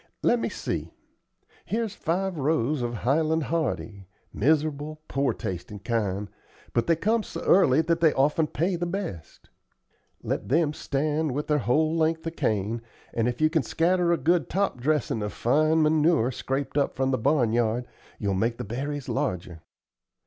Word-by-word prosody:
Let 240 - +3
me - - -1
see. - - -4 0.7
Here's 220 -1 -2
five 190 +1 -1
rows 150 -2 0
of 120 -1 -1
Highland 155 +7 +1
Hardy; 115 - -2 0.3
miserable 150 +3 0
poor 135 0 +1
tastin' 90 +3 -5
kind; 100 -1 -2 0.5
but 120 - +1
they 165 - +4
come 220 +7 +1
so - - -7
early 155 -6 +5
that 165 +1 0
they 160 -2 +6
often 150 +3 +2
pay 175 +6 0
the 175 +1 -2
best. 170 - -6 0.7
Let - - -3
them 150 +2 +2
stand 150 0 -1
with 145 +3 -2
their 150 -1 +1
whole 155 +6 +2
length 160 0 +1
of 165 0 -4
cane, 110 0 -1 0.3
and 115 0 +1
if 120 0 -2
you 155 0 +4
can 160 -2 +2
scatter 170 +6 +1
a 170 - +3
good 160 0 +1
top 195 -9 0
dressin' 145 -5 0
of 105 0 -3
fine 155 +6 +3
manure 155 -4 +3
scraped 135 +3 -2
up 140 - 0
from 135 0 +1
the 130 - 0
barnyard, 120 -2 +1 0.3
you'll 100 -2 -1
make 115 +5 0
the 125 - -4
berries 135 +5 -4
larger. 90 - -3
145 Hz, 165 wpm, -26 LUFS, 120-160 Hz, 0.7 s, they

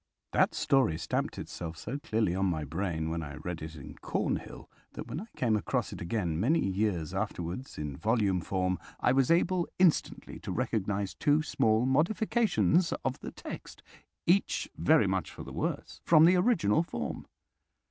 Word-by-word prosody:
That - - +3
story 130 - +2
stamped 80 - -2
itself 85 -2 -6
so 125 - -5
clearly 110 -9 0
on 95 +1 +1
my 80 -4 -1
brain 80 +1 -2
when 85 0 -2
I 75 -2 -7
read 85 +3 -5
it 80 +1 -7
in 70 -3 -9
Cornhill - - -3 0.3
that - - -6
when 155 - -5
I 220 - -9
came 115 -4 +2
across 105 - -1
it - - -8
again 85 -3 -1
many 135 - +3
years 95 -5 -1
afterwards 90 +10 -4
in 75 -2 -4
volume 105 -5 +1
form, 90 0 -1 0.2
I - - +3
was 135 -1 +3
able 175 +1 +2
instantly 180 -4 +1
to - - -6
recognize 100 -3 -1
two 145 - +2
small 110 -5 +2
modifications 180 - +2
of 130 0 -1
the - - -6
text—each 190 +4 -3
very - - +4
much - - -1
for - - -9
the - - -9
worse—from 160 -1 +2
the 180 +2 +6
original 180 - +3
form. 170 - -5
105 Hz, 160 wpm, -30 LUFS, -, 0.3 s, the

